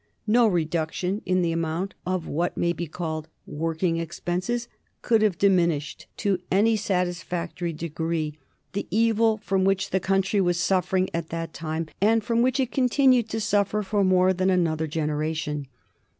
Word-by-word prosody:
No 230 +2 +4
reduction 175 +2 -1
in 185 -1 +2
the 170 - +1
amount 165 +3 -2
of 185 -2 -1
what 170 +4 -2
may 170 0 +1
be 170 -1 -4
called 160 -1 -4 0.2
working 165 +2 -1
expenses 180 +8 -3 0.4
could 225 -2 +3
have 210 -5 +2
diminished, 170 -7 +1
to 200 -4 0
any 220 +4 +3
satisfactory 175 -3 -2
degree, 160 -1 -3 0.3
the 200 - -3
evil 225 +1 +3
from 195 -3 0
which 195 0 +1
the 190 - +2
country 195 +2 +1
was 175 -2 +1
suffering 185 0 +1
at 165 -1 -3
that 165 0 -4
time, 160 0 -3 0.2
and 220 +2 +3
from 230 +2 +1
which 255 +2 +2
it 255 -2 0
continued 255 -2 +3
to 225 - -2
suffer 205 0 +1
for 205 +1 +1
more 185 0 +4
than 185 +1 +1
another 160 -4 +1
generation. 150 -1 -2
180 Hz, 155 wpm, -25 LUFS, 165-205 Hz, 0.4 s, No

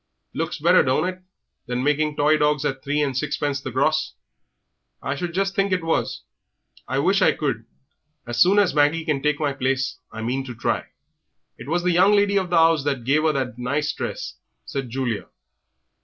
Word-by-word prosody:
Looks 165 +2 -3
better, 170 +4 +5
don't 130 +7 +1
it, 185 0 -5 0.5
than 125 +1 -2
making 150 +1 +1
toy 150 +2 +3
dogs 150 -1 +1
at 135 -2 -2
three 145 +1 0
and 135 -3 -2
sixpence 140 +2 -1
the 130 - -5
gross?" 155 +5 0 0.8
"I 135 - -3
should 170 +4 -4
just 195 +2 -1
think 195 0 +1
it 185 -2 0
was. 165 0 -1 0.6
I 130 - -2
wish 190 +8 +2
I - - +5
could. 125 -7 -3 0.6
As 120 -1 -2
soon 195 +3 +5
as 205 -3 +4
Maggie 150 +2 +2
can 150 -4 0
take 150 0 0
my 145 -3 0
place, 135 +1 -1
I 110 0 -6
mean 130 +4 -1
to 125 -2 -7
try." 120 - -2 0.7
"It 120 - -9
was 175 +2 0
the 180 - +2
young 185 +4 +5
lady 200 0 +3
of 185 -2 -4
the 175 - +1
'ouse 165 -2 +4
that 140 -4 -2
gave 145 +5 +2
'er 155 - +3
that 125 -3 -3
nice 145 +5 -1
dress," - - -5 0.3
said 135 -3 -4
Julia. 120 -3 -3
150 Hz, 195 wpm, -23 LUFS, 135-165 Hz, 0.8 s, better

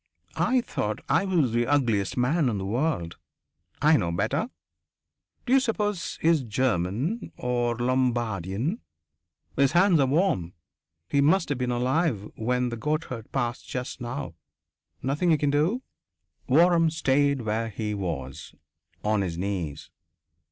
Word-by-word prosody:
I 255 0 +2
thought 105 - -3
I - - +3
was 170 - +2
the 120 +1 +1
ugliest 120 -9 +1
man 135 +3 +2
in 110 - -1
the 95 - -4
world. 115 - -1 0.7
I 155 +1 +6
know 85 -8 -1
better... 150 - -1 1.0
D'you 265 +1 +5
suppose 210 -7 -2
he's 165 -2 +4
German, 120 - -1
or 120 -1 -1
Lombardian? 120 - 0 0.8
His 140 +1 +3
hands 175 -1 +5
are 135 - +4
warm. 135 - +1 0.5
He 140 - +2
must 165 +4 +3
have 145 -3 -1
been 125 -1 -1
alive 125 - 0
when 125 +2 0
the 120 - -5
goatherd 130 -3 -3
passed 120 -3 -2
just 125 0 -5
now. 125 -1 -5 0.7
Nothing 145 +7 +1
you 160 - +5
can 145 -1 +1
do?" 170 - +1 0.7
Waram 165 +3 +5
stayed 140 -3 +2
where 110 +1 -1
he 105 0 -3
was, 80 -10 -5 0.5
on 105 -1 +1
his 85 -3 -3
knees. 85 -6 -4
125 Hz, 135 wpm, -26 LUFS, 110-160 Hz, 1.0 s, I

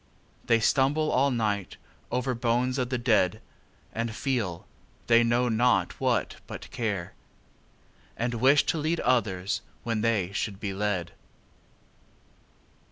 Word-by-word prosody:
They 115 -1 +4
stumble 140 +6 +2
all 140 +2 +3
night 105 -6 -1 0.3
over 125 +1 0
bones 120 +2 0
of 125 -1 -1
the 130 - 0
dead; 110 -4 +2 0.5
And 115 +1 -2
feelâthey 115 0 -1
know 120 +1 +2
not 120 +2 +2
what - - 0
but - - -9
care; 100 -7 -3 1.0
And 120 +1 -1
wish 135 +5 +4
to 165 - 0
lead 160 +2 0
others, 100 -7 0 0.2
when 115 -2 -1
they 105 -5 +1
should 100 0 -3
be 100 -2 -3
led. 95 -4 -1
115 Hz, 120 wpm, -27 LUFS, 105-125 Hz, 1.0 s, They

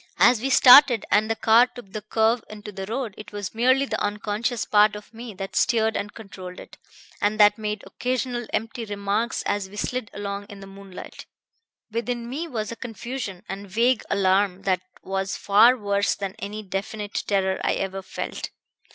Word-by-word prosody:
As 240 -3 +5
we 270 - -1
started, 250 -2 +8
and 215 +1 +3
the 225 - +1
car 230 +3 +5
took 245 -6 -13
the 215 - -4
curve 220 +2 +1
into 210 0 -9
the 195 -1 -6
road, 230 -1 -3
it 210 - -10
was 205 -2 -5
merely 255 +4 +3
the - - -3
unconscious 210 +3 -1
part 210 0 +4
of 210 +2 -11
me 230 -2 -9
that 195 0 -6
steered 225 -3 +2
and 205 +1 -3
controlled 185 -4 -10
it, - - -12 0.5
and 210 +1 +1
that 210 +1 +6
made 210 -1 -3
occasional 250 -2 -3
empty 225 +2 -3
remarks 205 +2 -2
as 205 -2 -2
we 205 - -13
slid 250 +1 -3
along 200 0 -5
in 200 -1 -11
the 195 - -10
moonlight. 195 -1 -11 0.6
Within 235 +1 -3
me 295 +7 -4
was 225 -7 -4
a - - -5
confusion 230 -4 -6
and 195 +1 -7
vague 235 +5 +2
alarm 195 -1 +2
that 185 -2 +1 0.2
was 195 -1 -2
far 225 +5 +5
worse 200 -2 0
than 195 -2 -4
any 210 +2 -5
definite 205 +2 -4
terror 190 -2 +1
I - - +2
ever 195 0 -3
felt. 190 - -5
210 Hz, 180 wpm, -24 LUFS, 200-235 Hz, 0.6 s, started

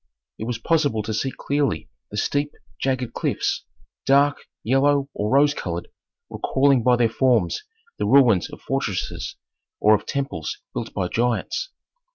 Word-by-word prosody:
It 110 - -3
was 120 -1 -2
possible 145 -5 +1
to 110 +1 -3
see 110 +5 0
clearly 140 +2 -1 0.2
the 105 - -7
steep, 145 +6 0 0.3
jagged 130 -3 -1
cliffs, - - -1 0.4
dark, 140 +1 +3 0.2
yellow 140 +3 +2
or 105 +1 -2
rose 145 +3 +4
colored, 85 -9 -4 0.4
recalling 135 -1 +2
by 125 +2 +4
their 120 -1 +3
forms 115 -6 +2 0.4
the - - 0
ruins 125 -10 +5
of - - -11
fortresses - - -2 0.4
or 105 - +5
of 105 - 0
temples 135 - -3 0.2
built - - -4
by 90 - 0
giants. 120 - -1
130 Hz, 145 wpm, -23 LUFS, 110-140 Hz, 0.4 s, ruins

